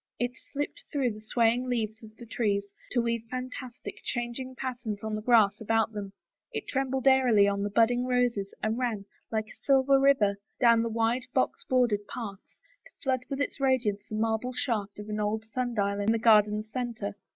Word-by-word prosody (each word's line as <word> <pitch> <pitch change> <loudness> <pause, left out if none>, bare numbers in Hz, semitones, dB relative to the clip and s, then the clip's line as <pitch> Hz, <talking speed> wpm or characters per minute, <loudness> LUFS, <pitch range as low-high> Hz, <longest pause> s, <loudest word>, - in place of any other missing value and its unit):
It 245 0 0 0.2
slipped 290 +1 -4
through 270 -4 +1
the 215 - -11
swaying 235 +3 +1
leaves 225 -2 -2
of 215 0 -13
the 240 - -10
trees 205 -3 0 0.2
to 240 -2 +1
weave 230 -1 0
fantastic, 255 0 -6
changing 245 +2 -4
patterns 240 -6 -4
on 220 0 -3
the 215 - -2
grass 220 -3 +4
about 225 +1 +1
them, 205 -2 -6 0.4
it - - -5
trembled 265 -1 -1
airily 250 -6 +5
on 200 0 0
the 205 - -1
budding 240 +4 +3
roses 245 -6 +1
and 220 +2 0
ran, 225 -6 -1 0.3
like 220 -1 0
a - - -17
silver 275 0 +4
river, 225 -8 +3 0.2
down 235 -2 +5
the 230 - -1
wide, 230 +3 0
box 260 - +1
bordered 235 -5 +2
paths, 205 -5 -8 0.3
to - - -24
flood 260 -1 0
with 275 -1 -3
its 285 - -2
radiance 250 -7 +1
the 215 - -4
marble 225 +3 0
shaft 210 -6 -2
of 210 0 -8
an 215 0 -3
old 215 +1 -1
sun 245 +1 -3
dial 200 -1 0
in 205 +2 +2
the 230 - +2
garden's 215 -1 +4
center. 235 -5 -3
230 Hz, 190 wpm, -28 LUFS, 215-255 Hz, 0.4 s, airily